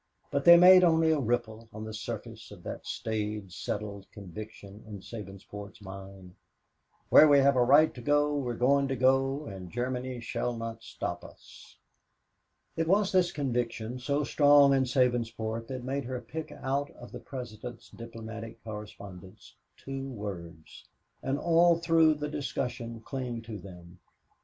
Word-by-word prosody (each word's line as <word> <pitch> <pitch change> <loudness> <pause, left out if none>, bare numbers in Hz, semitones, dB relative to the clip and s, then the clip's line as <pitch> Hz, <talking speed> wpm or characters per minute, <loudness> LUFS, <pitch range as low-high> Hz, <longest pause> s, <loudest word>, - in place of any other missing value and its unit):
But 140 0 -1
they 170 0 +10
made 185 +1 +9
only 160 -2 +4
a 155 - +2
ripple 115 -2 -2
on 110 +1 -7
the 110 0 -6
surface 110 0 -7
of - - -13
that - - -7
staid, 105 -3 -3
settled 100 +3 -5
conviction 100 +1 -10
in 105 -2 -8
Sabinsport's 100 -1 -9
mind 95 -2 -10 0.8
"where 155 - +9
we 145 -1 +6
have 140 0 +5
a 125 - +4
right 145 +5 +5
to 125 - -9
go, 145 +3 +2
we're 125 -4 -2
going 140 +3 +3
to 135 - -1
go, 135 +3 +2
and 95 -5 -8
Germany 125 +3 -3
shall 120 0 -3
not 115 0 -6
stop - - -5
us." - - -15 1.0
It 165 0 -1
was 200 +2 +3
this 180 -2 +3
conviction, 120 -3 -2
so 140 +3 0
strong 145 -1 +5
in 135 -1 +3
Sabinsport, 115 -3 0
that 130 -2 -5
made 135 +1 -3
her 125 0 -4
pick 155 +3 -7
out 140 +1 -2
of 120 - -12
the - - -7
President's 120 -2 -8
diplomatic 115 -1 -9
correspondence 100 -3 -10 0.2
two 135 0 -6
words, 85 -9 -8 0.4
and 135 +1 -1
all 170 +1 +4
through 165 -2 +4
the 150 0 -4
discussion 125 -5 -4
cling 125 -2 -5
to 110 -2 -7
them. 90 -1 -13
120 Hz, 150 wpm, -29 LUFS, 110-140 Hz, 1.0 s, they